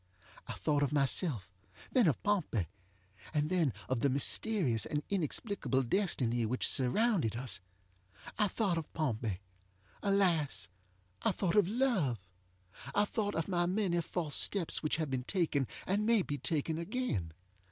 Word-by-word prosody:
I - - -4
thought 145 -1 0
of 145 - +1
myself, 135 - 0 0.4
then 245 -7 +4
of 145 - 0
Pompey, 175 - 0 0.7
and 150 +2 +1
then 170 -7 +2 0.2
of 130 -2 0
the 140 - +2
mysterious 140 - +1
and 150 0 -2
inexplicable 185 - -1
destiny 125 - +1
which 120 +3 +1
surrounded 140 - +3
us. 120 -4 0 0.8
I 210 - +4
thought 190 -4 0
of 160 - -9
Pompey! 110 - -2 0.6
ŌĆöalas, 175 - +1 0.5
I - - +2
thought 185 -4 -1
of 205 -4 +5
love! 210 - +1 0.8
I 205 - +4
thought 205 -1 -2
of 165 - -1
my 175 -2 +1
many 180 -2 +1
false 165 -3 -3
steps 190 -5 +2
which 155 - 0
have 155 -3 -2
been 125 -1 -2
taken, 155 -8 0 0.2
and 200 +3 0
may 225 -2 +3
be 145 -3 -4
taken 160 +3 0
again. 170 - -2
160 Hz, 145 wpm, -33 LUFS, 130-200 Hz, 0.8 s, of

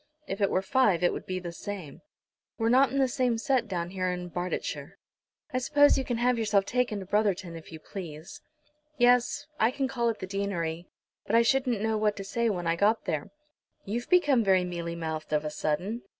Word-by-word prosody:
"If 200 -6 -5
it 200 - +3
were 185 - 0
five 195 -5 +2
it 175 - +3
would - - -7
be 185 - -2
the 175 -2 -5
same. 175 -4 -7 0.6
We're 225 -1 +1
not 260 +3 +5
in 275 - -2
the 270 -1 +4
same 250 -2 0
set 245 0 +1
down 175 -3 -3
in 180 -1 -2
Barsetshire." 175 +1 -4 0.6
"I 255 - +1
suppose 290 +3 +5
you 270 - 0
can 245 -2 -2
have 245 0 +2
yourself 205 -3 +2
taken 245 -3 0
to - - -7
Brotherton 190 -4 0
if 165 0 -11
you 160 - -8
please?" 175 - -9 0.6
"Yes, 245 +3 +3
I 220 - +4
can 265 +1 -1
call 240 -3 0
at 225 - -2
the - - -5
deanery; 180 -4 -3 0.4
but 220 - +1
I 230 - +6
shouldn't 250 -3 +1
know 220 0 0
what 210 -1 +1
to 195 - -6
say 235 +4 0
when 180 -4 -2
I 165 0 +2
got 210 +5 +2
there." 150 -2 -2 0.6
"You've 235 +4 -4
become 290 -10 +4
very 190 -2 +4
mealy 170 -1 -4
mouthed 160 -2 -4
of 150 0 +1
a 150 - -2
sudden." 180 +10 -2
205 Hz, 210 wpm, -28 LUFS, 175-240 Hz, 0.6 s, I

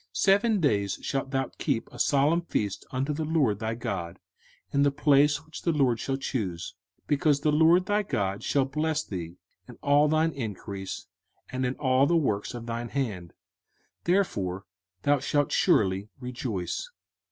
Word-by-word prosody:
05:016:015 - - -3
Seven 205 +2 +3
days 100 - +1
shalt 135 -1 -2
thou 135 -1 -1
keep 115 - -1
a - - -10
solemn 145 +4 +3
feast 105 - -2
unto 135 +3 -1
the 160 +2 -2
LORD 145 -10 +1
thy 110 +1 -2
God 110 -8 -4 0.5
in 140 - +2
the 145 - +5
place 145 +1 +3
which 155 - -9
the 170 - +1
LORD 135 -7 +2
shall 135 +2 -2
choose: 100 -11 -3 0.3
because 145 0 +2
the 150 - +2
LORD 165 +4 +5
thy 205 +1 +2
God 100 - -2
shall 140 -2 +1
bless 155 +2 -1
thee 85 -2 -6 0.3
in - - -11
all 145 +1 +5
thine 155 +2 +2
increase, 100 - -6 0.5
and 130 0 -1
in 125 - -2
all 130 -1 +3
the 170 - +3
works 115 -9 -1
of 120 -1 -7
thine 120 0 -4
hands, 105 - -3 0.7
therefore 100 - 0 0.4
thou 145 0 +3
shalt 145 +1 0
surely 95 +1 +2
rejoice. 125 - -4
135 Hz, 165 wpm, -27 LUFS, 105-150 Hz, 0.7 s, the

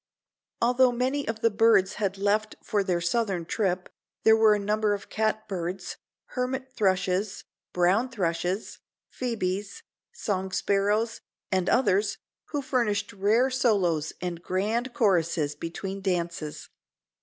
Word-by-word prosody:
Although 250 +1 +4
many 260 +4 -1
of 225 0 -3
the 230 - +3
birds 205 -3 +4
had 195 -1 0
left 210 +2 +1
for 205 -2 0
their 180 -3 0
southern 190 -2 0
trip, 185 -1 -1 0.4
there 220 - +7
were 220 -1 +5
a - - -1
number 210 +1 +1
of 200 - -10
catbirds, 195 -4 -2 0.3
hermit 255 +1 -3
thrushes, 190 -1 0 0.3
brown 185 +8 +2
thrushes, 185 -2 -2 0.3
phoebes, 205 -5 -3 0.3
song 190 - -2
sparrows 205 +4 +1 0.3
and 185 -2 +1
others 205 -4 +2 0.3
who 290 -2 -3
furnished 210 -6 0
rare 215 +7 +2
solos 190 - +1
and 175 -2 -4
grand 215 +8 -1
choruses 170 - +2
between 190 +6 -5
dances. 170 -5 -3
205 Hz, 120 wpm, -27 LUFS, 185-225 Hz, 0.4 s, there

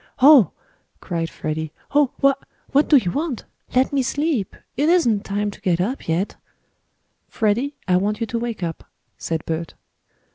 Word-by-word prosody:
"Oh!" 270 - +8 0.5
cried 165 -3 -3
Freddie. 155 0 -4 0.2
"Oh! 290 -2 +4
Wha 275 0 +6 0.4
what 285 +2 +3
do 295 - +8
you 180 -9 +1
want? 290 - -3 0.3
Let 260 +2 +3
me 275 - +3
sleep! 280 - -1 0.2
It 290 +5 +2
isn't 240 - +3
time 205 +1 -1
to 200 - -14
get 180 -4 +1
up 230 +10 -2
yet." 170 +5 -1 0.9
"Freddie, 235 +6 0
I 180 -1 +4
want 210 +3 0
you 230 - 0
to 230 +1 -3
wake 230 -5 -4
up," 165 -2 -4 0.4
said 160 -1 -3
Bert. 165 0 -4
220 Hz, 160 wpm, -22 LUFS, 180-275 Hz, 0.9 s, Oh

